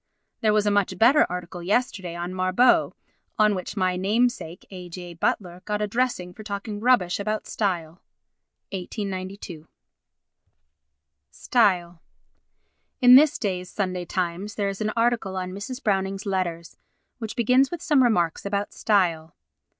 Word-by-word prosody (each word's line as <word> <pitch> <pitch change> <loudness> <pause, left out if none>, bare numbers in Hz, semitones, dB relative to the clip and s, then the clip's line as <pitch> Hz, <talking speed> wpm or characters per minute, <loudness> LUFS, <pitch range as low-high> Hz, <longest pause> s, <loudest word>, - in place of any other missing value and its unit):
There 215 - +2
was 210 0 +2
a 205 - +2
much 205 -2 +1
better 265 +7 +5
article 180 0 -6
yesterday 190 -3 -1
on 175 +1 -4
Marbot, 185 +6 +3 0.4
on 215 -1 +4
which 190 +2 -5
my 185 -1 +1
namesake 205 -2 0
A. 180 -2 -9
J. 175 0 -8
Butler 175 +1 -2
got 210 -1 -2
a 210 - 0
dressing 215 -5 -1
for 215 - -11
talking 205 0 -5
rubbish 215 -7 +2
about 215 +1 -2
style. 175 -5 -2 0.7
[1892.] 185 -3 -6 1.6
Style 175 - +1 1.0
In 250 0 +7
this 295 +3 +7
day's 185 -4 -3
Sunday 185 -3 -3
Times 185 +3 -3
there 200 -2 0
is 195 +2 -6
an 215 0 0
article 230 -5 +1
on 185 0 -3
Mrs. 250 +7 -7
Browning's 195 -1 -1
letters 175 -4 -3 0.4
which 220 -2 -5
begins 250 +3 +3
with 345 -1 -6
some 295 -5 +4
remarks 175 -10 +1
about 200 0 -2
style. 170 -6 +1
195 Hz, 140 wpm, -24 LUFS, 180-215 Hz, 1.6 s, In